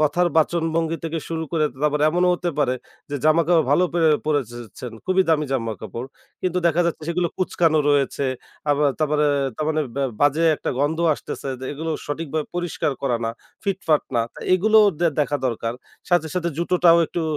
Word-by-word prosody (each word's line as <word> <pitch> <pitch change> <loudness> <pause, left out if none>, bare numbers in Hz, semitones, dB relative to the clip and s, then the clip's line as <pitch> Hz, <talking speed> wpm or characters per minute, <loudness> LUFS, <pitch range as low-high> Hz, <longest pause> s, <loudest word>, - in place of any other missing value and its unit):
কথার 175 +4 +2
বাচনভঙ্গি 165 0 +1
থেকে 165 0 -2
শুরু 165 -1 -3
করে 155 -2 +2 0.2
তারপর 150 0 +1
এমনও 180 +3 +2
হতে 175 0 -2
পারে 135 -4 +2 0.4
যে, 145 - -3
জামাকাপড় 165 +1 +4
ভালো 175 +5 +4
পেরে 165 -2 +4 0.2
পড়েছেন। 120 -5 -3
খুবই 185 0 +3
দামি 155 -2 +3
জামাকাপড়, 115 -1 -4 0.4
কিন্তু 180 -1 0
দেখা 170 +1 +2
যাচ্ছে 165 -2 -3
সেগুলো 170 0 0
কুঁচকানো 165 -3 +2
রয়েছে। 140 -1 +1 0.5
আবার 145 0 +3
তারপরে 150 -1 +2 0.3
তারমানে 155 0 0 0.4
বাজে 145 +3 +3
একটা - - -3
গন্ধ 150 +4 0 0.2
আসতেছে 140 - -7
যে, 130 - -6
এগুলো 160 +3 -4 0.2
সঠিকভাবে 155 0 -3
পরিষ্কার 175 -4 -1
করা 125 -4 +1
না, 115 - 0 0.3
ফিট-ফাট 190 -6 +1
না - - +4
তা - - -11 0.2
এগুলোও 215 +3 +5 0.3
দেখা 145 0 +1
দরকার। 115 -1 -2 0.3
সাথে, 175 -3 +2
সাথে 170 -1 0
জুতোটাও 170 0 +4
একটু 170 - -3
160 Hz, 160 wpm, -22 LUFS, 145-170 Hz, 0.5 s, এগুলোও